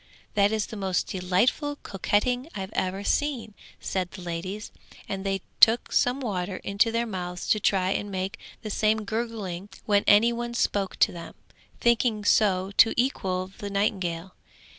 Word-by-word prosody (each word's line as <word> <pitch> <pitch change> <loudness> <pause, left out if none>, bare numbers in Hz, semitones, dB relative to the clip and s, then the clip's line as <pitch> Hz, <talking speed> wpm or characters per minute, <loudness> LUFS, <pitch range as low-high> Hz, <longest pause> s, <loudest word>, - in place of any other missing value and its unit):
'That 200 0 +3
is 220 -1 0
the - - -9
most 190 -3 0
delightful 195 - 0
coquetting 245 - 0
I 195 - -3
have 190 +2 -7
ever 190 +2 -1
seen!' 260 -4 -1 0.3
said 185 -2 -2
the 185 - -10
ladies, 180 +5 -5 0.4
and 195 -1 -4
they 195 -1 -1 0.2
took 230 +1 +6
some 250 +2 +2
water 190 -6 -3
into 200 +4 +2
their 230 +1 0
mouths 180 -4 -5
to 215 - +4
try 190 -2 +2
and 205 +1 -2
make 190 0 -3 0.2
the 215 - -4
same 215 +1 +1
gurgling 210 -4 -4 0.2
when 205 -1 +3
any 225 +3 +6
one 235 0 -4
spoke 200 -5 0
to - - +3
them, 170 -1 -9 0.4
thinking 235 -3 +2
so 190 -3 +3
to 225 - +6
equal 190 -7 0
the 205 - -4
nightingale. 190 -3 -1
200 Hz, 160 wpm, -26 LUFS, 185-225 Hz, 0.4 s, took